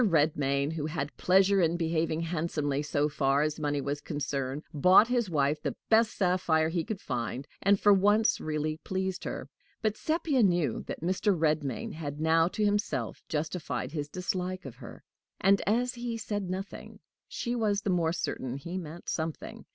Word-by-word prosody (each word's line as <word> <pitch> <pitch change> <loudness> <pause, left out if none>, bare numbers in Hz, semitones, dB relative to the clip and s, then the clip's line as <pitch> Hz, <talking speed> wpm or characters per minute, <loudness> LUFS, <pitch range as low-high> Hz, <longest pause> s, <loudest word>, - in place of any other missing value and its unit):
Redmain, 145 - +2
who 155 -2 -3
had 145 -1 -4
pleasure 195 +1 +4
in 170 0 +2
behaving 165 -1 0
handsomely 155 -4 -1
so 145 0 0
far 140 -1 +2
as 155 +1 -2
money 145 -1 0
was 145 +1 -3
concerned, 140 -1 -3
bought 185 - +6
his 240 -5 +1
wife 150 -1 +1
the - - -2
best 220 0 +4
sapphire 180 -4 +2
he 165 0 -1
could 215 -1 -4
find, 125 - -4
and, 200 0 +4
for 205 - +6
once, 205 +3 +3
really 155 0 -2
pleased 190 +2 -3
her. - - -4 0.4
But 215 -1 +1
Sepia 310 -1 +1
knew 175 -7 +2
that - - -5
Mr. 185 +3 +1
Redmain 150 -6 0
had 145 -2 -5
now 165 +1 +4
to 210 +3 -1
himself 205 0 -1
justified 155 -3 -3
his 145 -2 -4
dislike 185 +1 -3
of 125 -2 -8
her; 120 -3 -11 0.4
and, 195 0 +4
as 245 +4 +2
he 240 -2 -4
said 205 -4 -3
nothing, 190 +2 -6 0.3
she 240 - -3
was 210 -4 0
the 195 - 0
more 170 -3 +2
certain 130 -6 -3
he 170 +6 -5
meant 170 0 -9
something. 160 -1 -4
165 Hz, 170 wpm, -29 LUFS, 150-195 Hz, 0.4 s, bought